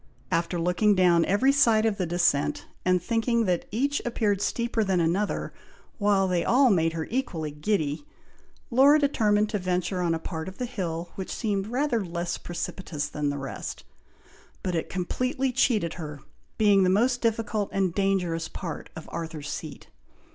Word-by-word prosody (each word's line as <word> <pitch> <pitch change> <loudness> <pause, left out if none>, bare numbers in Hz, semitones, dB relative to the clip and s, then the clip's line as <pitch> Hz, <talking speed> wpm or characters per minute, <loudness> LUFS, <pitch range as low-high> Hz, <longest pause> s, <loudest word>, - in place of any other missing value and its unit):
After 170 +1 0
looking 180 +5 +3
down 175 -3 +4
every 250 +8 +3
side 230 -6 +4
of 215 -3 +1
the 180 - 0
descent, 175 -4 +1 0.2
and 185 0 +3
thinking 230 +4 +1
that 180 -3 0
each 280 +7 0
appeared 210 -4 0
steeper 235 0 0
than 190 -3 +1
another, 175 +5 0 0.5
while 200 -2 +3
they 180 -2 +1
all 255 0 +4
made 165 -3 +2
her 160 -1 -3
equally 185 - -2
giddy, 150 - -1 0.7
Laura 275 +5 +6
determined 215 -8 +2
to 210 - -1
venture 180 0 -1
on 170 -2 +1
a - - -1
part 160 0 -5
of 190 - -8
the 250 - -2
hill 175 -6 -4
which 190 - -6
seemed 200 -3 -2
rather 245 -1 0
less 170 -1 -3
precipitous 175 -3 -4
than 150 -1 -2
the 145 - -2
rest; 135 -1 -6 0.8
but 185 - -1
it 165 - -2
completely 255 +8 -1
cheated 215 -9 +1
her, 150 -5 -7 0.4
being 205 -3 +5
the 185 - +4
most 245 +6 +2
difficult 220 -2 0
and 190 -3 0
dangerous 180 -4 0
part 165 -5 -6
of 160 - -9
Arthur's 160 -3 -5
Seat. 155 -3 -7
190 Hz, 165 wpm, -26 LUFS, 170-225 Hz, 0.8 s, Laura